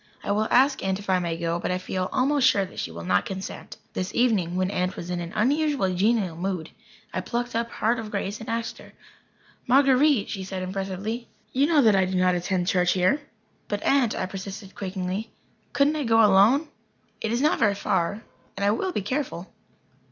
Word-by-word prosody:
I - - -2
will 215 +2 +1
ask 270 +2 +3
Aunt 190 0 0
if 200 -1 -4
I 185 - +3
may 170 -2 -2
go, 170 0 -1
but - - -3
I 180 - 0
feel 185 0 -3
almost 275 0 +3
sure 200 -6 +3
that 185 - -10
she - - -3
will 85 +1 -8
not 95 +2 +2
consent." 190 0 -7 0.2
This 185 0 -3
evening, 210 -8 +2
when 185 +1 0
Aunt 180 -1 -1
was 175 +1 -6
in 175 - -2
an 170 0 -5
unusually 275 -3 +1
genial 195 -2 +1
mood, 180 -2 -3 0.4
I 185 - -1
plucked 240 +4 -3
up 230 0 -1
heart 230 +1 0
of 220 -1 -6
grace 200 0 -3
and 220 - -8
asked 230 0 -3
her. - - -14 0.8
"Marguer_ite_," 270 -2 +4
she 195 -3 -5
said 185 0 -5
impressively, 195 +5 -4 0.3
"you 275 +3 +3
know 305 -4 +4
that 215 -3 +5
I 190 -1 +3
do 185 +1 -3
not 180 0 +3
attend 180 +1 -1
church 180 -2 +3
here." 185 +11 +2 0.5
"But, 205 0 -3
Aunt," 270 -5 +3
I - - -1
persisted, 195 +1 -7
quakingly, 190 +2 -4 0.4
"couldn't 285 +2 +2
I 300 - -1
go 225 -2 +5
alone? 215 +10 +4 0.5
It 220 - -1
is 235 - +1
not 300 +3 +2
very 210 -5 +3
far 200 +1 -1 0.3
and 200 - 0
I 205 - +4
will 370 - -1
be 210 - -2
very - - -12
careful." 250 - -3
200 Hz, 210 wpm, -25 LUFS, 185-240 Hz, 0.8 s, that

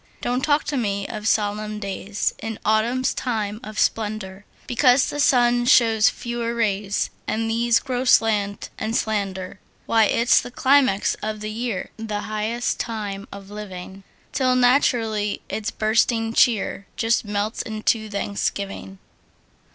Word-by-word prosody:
Don't 250 +1 -1
talk 290 +1 +2
to 290 - -2
me 200 -4 -1
of 215 -1 -5
solemn 210 0 0
days 200 0 -2
In 225 0 -5
autumn's 230 +5 +2
time 215 -4 -2
of 215 0 -8
splendor, 210 -3 -1 0.2
Because 250 +1 +4
the 290 - -5
sun 240 -3 +3
shows 225 -3 +5
fewer 235 -1 -4
rays, 205 -3 0 0.2
And 225 +1 -1
these 230 +1 +2
grow 255 -2 -3
slant 210 -4 +2
and 220 +1 -2
slender. 195 -5 -2 0.3
Why, 225 -1 +4
it's 235 +3 +3
the - - -8
climax 260 -5 +3
of 215 0 -3
the 215 0 -4
year, 225 -3 -3
The 215 -2 -4
highest 215 +3 -2
time 205 -3 -4
of 200 0 -10
living! 195 -2 -8 0.3
Till 255 -2 +2
naturally 235 -5 +2
its 220 0 -2
bursting 225 +1 +1
cheer 215 -4 +2
Just 230 0 +1
melts 205 +1 -2
into 220 0 -1
thanksgiving. 200 -1 -3
220 Hz, 135 wpm, -23 LUFS, 205-235 Hz, 0.3 s, shows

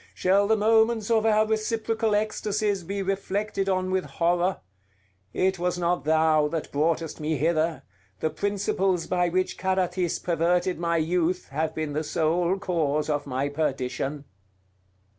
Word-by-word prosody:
Shall 195 +2 +3
the 220 +1 +3
moments 220 +1 +3
of 225 -1 +3
our 215 0 +4
reciprocal 220 0 0
ecstasies 210 -1 -1
be 195 +3 -3
reflected 195 +1 -2
on 185 0 0
with 190 0 0
horror! 175 +2 0 0.7
It 190 - 0
was 180 0 -1
not 175 -2 0
thou 155 -1 +3
that 160 0 -4
broughtest 160 +2 -1
me 155 0 -1
hither: 160 +2 0 0.4
the 155 - -1
principles 190 0 0
by 180 -1 +1
which 185 +2 -1
Carathis 185 -2 0
perverted 175 +1 0
my 170 -1 0
youth 175 +2 0
have 155 +3 -2
been 155 -2 -3
the 155 +2 -1
sole 170 +4 +1
cause 155 -5 -1
of 145 -1 -2
my 135 +1 -1
perdition!" 140 -1 -2
180 Hz, 140 wpm, -26 LUFS, 160-195 Hz, 0.7 s, our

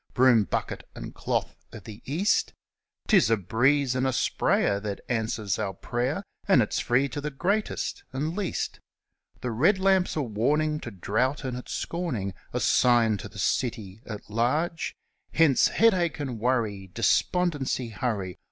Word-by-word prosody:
Broom, 120 -4 +5
Bucket, - - -4
and - - -7
Cloth - - -2 0.2
of - - -10
the 110 +1 -10
East! 190 +8 +1 0.5
'Tis 195 - +5
a 115 - +3
breeze 125 +8 +2
and 130 +1 0
a - - +1
sprayer 100 -3 +1
that 100 -1 -5
answers 110 -4 -1
our 100 -3 -2
prayer, 125 - -2 0.2
And 190 -9 +5
it's 105 - -2
free 130 +3 +2
to 145 - -5
the 150 - -2
greatest 195 +10 -2
and 150 +5 -2
least. 200 -4 -3 0.6
The 125 - -2
red 160 - +3
lamp's 190 -1 +2
a 150 - 0
warning 150 +7 0
to 120 - -7
drought 115 - -1
and 130 -2 -3
its 125 - -7
scorning 125 - -3 0.2
A - - -1
sign 115 -3 +4
to - - -8
the - - -14
city 110 -4 -2
at 105 -2 -7
large 150 +10 -1 0.4
Hence, 155 -5 +5
Headache 185 -9 +2
and 130 -6 -4
Worry! 110 -5 -1
Despondency, 140 -1 +1
hurry! 105 -5 -3
125 Hz, 155 wpm, -27 LUFS, 110-155 Hz, 0.6 s, Broom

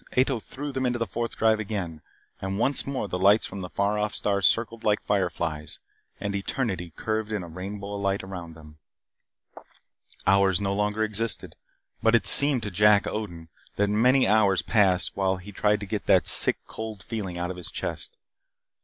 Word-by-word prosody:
Ato 130 -1 +2
threw 145 +6 -7
them 130 -1 -1
into 120 0 -1
the 115 - -1
Fourth 115 0 -4
Drive 110 -1 +3
again. 95 -7 -4 0.4
And 95 0 -3
once 135 +6 0
more 135 -6 -2
the 90 - -4
lights 100 +3 +4
from 100 0 -7
the 90 - -6
far 100 +3 0
off 105 0 -1
stars 100 -1 +2
circled 115 0 -1
like 105 -1 +1
fireflies. 85 -6 -2 0.4
And 100 0 -3
eternity 100 - -3
curved 110 -1 -3
in 105 -4 -2
a - - -8
rainbow 100 +4 -7
of 100 - -4
light 100 0 -1
about 90 -4 -8
them. 75 -1 -15 1.5
Hours 95 -1 +3
no 100 -1 -1
longer 105 +2 0
existed, 110 +1 -2 0.5
but 115 +1 +4
it 115 - +2
seemed 140 -5 +6
to 105 - -4
Jack 105 +2 +4
Odin 85 -7 -5 0.3
that 100 0 +1
many 125 +5 +4
hours 100 -2 +3
passed 95 -5 +2
while 95 -1 0
he 95 +3 -11
tried 105 +1 +1
to - - -4
get 95 - -4
that - - +4
sick, - - +6
cold 110 -3 -7
feeling 100 -6 -5
out 90 +1 -3
of 90 - -8
his 90 - -5
chest. - - -5
100 Hz, 185 wpm, -26 LUFS, 95-110 Hz, 1.5 s, seemed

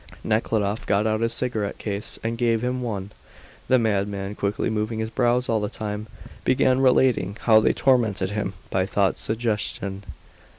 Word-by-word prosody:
Nekhludoff 110 -1 0
got 100 +1 +2
out 110 0 +1
his 115 0 +1
cigarette 110 -5 -2
case 100 -1 -4
and 115 +1 -1
gave 115 -1 +1
him 125 +1 -1
one. 105 -5 -4 0.6
The 130 - +5
madman, 100 -3 -1
quickly 100 0 -1
moving 110 +1 -1
his 110 0 -3
brows 125 +2 +1
all 115 -1 +1
the 105 -1 -2
time, 105 0 -5 0.4
began 130 0 +3
relating 125 -5 +3
how 110 -2 +6
they - - +3
tormented 110 -8 +2
him 105 -2 -2 0.2
by 95 0 +1
thought 100 -1 +1
suggestion. 105 -3 -2
110 Hz, 160 wpm, -24 LUFS, 100-120 Hz, 0.6 s, how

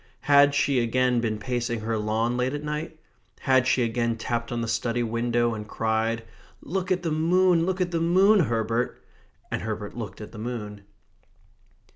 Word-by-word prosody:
Had 145 0 +5
she 140 -2 +2
again 125 +1 +1
been 110 -2 -1
pacing 120 +1 -2
her 115 +1 -2
lawn 110 +3 0
late 125 +3 0
at 145 - -5
night? 150 +2 -4 0.4
Had 130 -2 +3
she 130 -1 +3
again 115 0 -1
tapped 115 0 -3
on 120 -1 -2
the 115 - -2
study 120 +1 -1
window 120 +1 0
and 105 -1 -6
cried: 115 +1 -1 0.4
"Look 185 +3 -3
at 180 -1 +1
the 165 - -1
moon, 170 +2 +3
look 190 0 -1
at 175 -1 0
the 165 -1 -1
moon, 190 +5 +5
Herbert!" 115 - 0 0.5
And - - -2
Herbert 105 -2 -5
looked 105 -5 -6
at 105 - -9
the 110 - -10
moon. 105 -3 -5
120 Hz, 175 wpm, -25 LUFS, 115-150 Hz, 0.5 s, Had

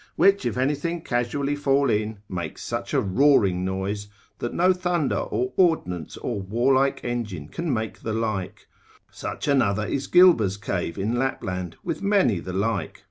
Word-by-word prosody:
which 195 -9 +4
if 120 - -3
anything 145 +6 0
casually 135 +4 -1
fall 140 -1 +2
in, 105 -1 0
makes 85 -5 -5
such 120 0 -4
a 140 - +3
roaring 100 -4 +3
noise, 95 +2 -3 0.3
that 120 - -3
no 185 +2 +3
thunder, 180 -4 0
or 125 +1 -2
ordnance, 90 - +1
or 115 -5 -3
warlike 130 +7 +2
engine 110 -11 -4
can 165 - -3
make 110 -3 -3
the 110 - -4
like; 110 -4 -3 0.5
such - - -5
another 110 -7 +2
is 135 +4 -2
Gilber's 165 - +5
Cave 95 -4 -3
in 110 +5 -1
Lapland, 90 -9 -3
with - - -3
many 195 - +3
the 95 - -6
like. 100 -2 -2
120 Hz, 155 wpm, -24 LUFS, 100-140 Hz, 0.5 s, Gilber's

